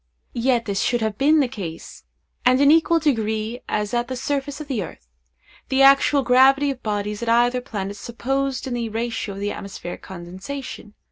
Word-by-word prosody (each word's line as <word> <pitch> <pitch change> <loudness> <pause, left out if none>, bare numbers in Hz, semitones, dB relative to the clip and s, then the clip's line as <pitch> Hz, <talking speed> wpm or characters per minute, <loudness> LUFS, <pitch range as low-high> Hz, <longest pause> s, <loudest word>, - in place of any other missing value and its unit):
Yet 240 -1 +1
this 200 -2 -1
should 240 -1 +1
have 220 -2 -2
been 300 +3 +5
the 270 - +1
case, 185 -10 -8 0.4
and 255 +1 +4
in 280 0 +5
an - - +8
equal 330 +1 +3
degree 225 -5 -1
as 210 0 -1
at 240 0 0
the 260 - -4
surface 280 +2 -3
of 305 - -7
the 255 -7 -2
earth, - - -9 0.6
the 270 0 +3
actual 275 +1 +5
gravity 270 +3 +5
of 260 - -8
bodies 210 0 -3
at 235 - -2
either 240 +2 +3
planet 205 -5 -5
supposed 265 +5 -2
in 260 - -4
the 235 -2 -2
ratio 225 -2 -3
of - - -7
the 205 0 -1
atmospheric 190 -3 -7
condensation. 190 +6 -8
240 Hz, 190 wpm, -22 LUFS, 210-270 Hz, 0.6 s, an